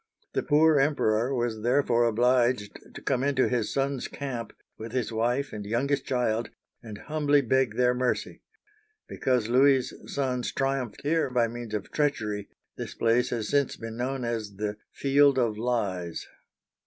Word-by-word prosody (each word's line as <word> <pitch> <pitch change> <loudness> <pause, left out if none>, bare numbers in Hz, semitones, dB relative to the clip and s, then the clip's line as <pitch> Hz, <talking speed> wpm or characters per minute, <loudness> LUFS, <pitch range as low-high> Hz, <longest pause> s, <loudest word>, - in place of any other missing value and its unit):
The - - +1
poor 155 0 +4
Emperor 130 -4 +2
was 120 -3 -2
therefore 120 -1 +2
obliged 120 -2 +1
to - - -8
come 130 - 0
into 135 -2 +2
his 120 -4 -1
sons* 135 -1 -1
camp, 125 -6 -5 0.2
with 110 +1 -8
his 125 -4 -1
wife 120 +5 0
and 105 -1 -5
youngest 130 +6 -1
child, 120 -3 0 0.3
and 110 -3 -9
humbly 145 0 +1
beg 130 -3 +1
their 125 0 +3
mercy. 125 0 -2 0.7
Because 125 -4 0
Louis's 130 +2 +4 0.2
sons 130 -3 -1
triumphed 135 -4 -2
here 155 0 +1
by 120 -2 +2
means 115 -2 -6
of 105 - -5
treachery, 105 -9 -1 0.3
this - - -6
place 115 +2 +2
has 115 -3 -3
since 140 -2 +1
been 115 0 -7
known 125 +1 -2
as 110 -4 -3
the 105 +1 -3
" - - -64
Field 140 0 +4
of 115 -4 +1
Lies." 100 -7 -2
125 Hz, 155 wpm, -27 LUFS, 115-135 Hz, 0.7 s, poor